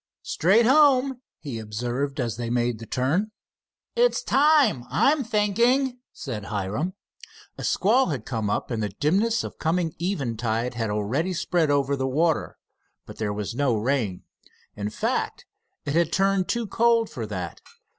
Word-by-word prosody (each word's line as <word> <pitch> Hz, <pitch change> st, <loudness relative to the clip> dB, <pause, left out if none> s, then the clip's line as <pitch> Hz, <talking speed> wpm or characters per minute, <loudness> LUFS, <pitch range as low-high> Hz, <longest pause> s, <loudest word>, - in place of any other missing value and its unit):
"Straight 205 Hz, +8 st, +3 dB
home," 270 Hz, -1 st, +4 dB, 0.2 s
he 130 Hz, -7 st, -6 dB
observed, 120 Hz, +6 st, -3 dB
as 120 Hz, -3 st, -1 dB
they 120 Hz, 0 st, -4 dB
made 120 Hz, -1 st, 0 dB
the 115 Hz, -, -9 dB
turn. 155 Hz, +12 st, 0 dB, 0.7 s
"It's -, -, +2 dB
time, 280 Hz, -, +4 dB
I'm 285 Hz, 0 st, +3 dB
thinking," 235 Hz, +4 st, +1 dB
said 110 Hz, -7 st, -6 dB
Hiram. 105 Hz, -, -3 dB, 0.6 s
A -, -, -5 dB
squall 240 Hz, +8 st, +3 dB
had 135 Hz, -10 st, -3 dB
come 110 Hz, -5 st, -2 dB
up, 105 Hz, -, -2 dB
and 115 Hz, -2 st, -1 dB
the 105 Hz, -, -1 dB
dimness 195 Hz, -, +1 dB
of -, -, -8 dB
coming 165 Hz, 0 st, 0 dB
eventide 120 Hz, -, -1 dB
had 115 Hz, -2 st, -2 dB
already 120 Hz, -, -1 dB
spread 170 Hz, -2 st, 0 dB
over 140 Hz, -1 st, +2 dB
the 135 Hz, -1 st, -1 dB
water, 160 Hz, +4 st, 0 dB, 0.5 s
but -, -, -11 dB
there 105 Hz, -2 st, -2 dB
was 105 Hz, +1 st, -4 dB
no 130 Hz, -1 st, +1 dB
rain. 110 Hz, -5 st, -1 dB, 0.5 s
In 105 Hz, 0 st, -3 dB
fact, 105 Hz, -, -2 dB, 0.4 s
it 140 Hz, -, -2 dB
had 170 Hz, 0 st, +2 dB
turned 195 Hz, 0 st, +2 dB
too 235 Hz, -1 st, 0 dB
cold 230 Hz, +1 st, +2 dB
for 115 Hz, -, -6 dB
that. 90 Hz, -5 st, -5 dB
145 Hz, 155 wpm, -25 LUFS, -, 0.7 s, home